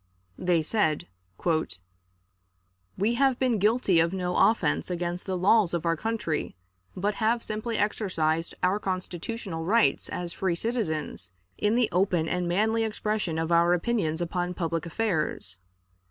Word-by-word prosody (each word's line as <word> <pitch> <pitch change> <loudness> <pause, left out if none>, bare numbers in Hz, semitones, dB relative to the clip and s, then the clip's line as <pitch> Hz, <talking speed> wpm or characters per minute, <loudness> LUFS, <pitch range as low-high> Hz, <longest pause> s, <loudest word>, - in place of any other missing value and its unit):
They 175 -3 +2
said: 160 -4 0 1.9
"We 210 +5 +2
have 265 -1 +3
been 250 -5 +1
guilty 210 -3 +3
of 165 +2 +2
no 180 -1 -2
offense 185 -9 +2
against 175 +1 -3
the 190 -1 -1
laws 185 -1 +4
of 170 - -3
our 165 0 +2
country, 210 - -2 0.4
but 205 +3 0
have 230 +2 +2
simply 215 +1 -3
exercised 170 -6 0
our 185 +3 +2
constitutional 185 -1 -4
rights 225 +7 +2
as 175 -1 -2
free 185 -3 0
citizens 160 - -2 0.3
in 210 +2 +2
the 240 -2 +3
open 180 -3 +2
and 180 +1 -1
manly 220 +6 +2
expression 210 -5 -1
of 165 +1 -1
our 170 +1 +5
opinions 175 -4 0
upon 180 +1 -2
public 165 -1 -2
affairs. 160 - -1
180 Hz, 140 wpm, -27 LUFS, 170-220 Hz, 1.9 s, our